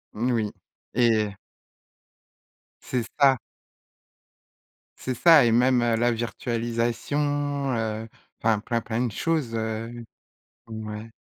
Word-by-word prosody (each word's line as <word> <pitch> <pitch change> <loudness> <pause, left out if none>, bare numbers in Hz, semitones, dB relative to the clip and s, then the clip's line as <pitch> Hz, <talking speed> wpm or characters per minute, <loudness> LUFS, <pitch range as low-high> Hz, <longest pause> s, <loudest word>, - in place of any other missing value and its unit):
N 120 +4 0
oui. 110 -3 0 0.4
Et 110 -4 +3 1.5
C'est 125 -2 -2 0.2
ça. 135 -2 +6 1.6
C'est 130 - -2
ça 160 -2 +7
et 115 - +3
même, 125 +1 +4
heu, 115 -1 +2
la 120 +1 +2
virtualisation, 120 +5 -1
heu, 110 0 -2 0.3
enfin 110 -2 +2
plein, 115 +2 -2
plein 120 +3 -1
de 120 - -2
choses, 150 -2 -1
heu, 115 +1 -4 0.7
ouais. 110 0 -6
115 Hz, 105 wpm, -25 LUFS, 110-130 Hz, 1.6 s, ça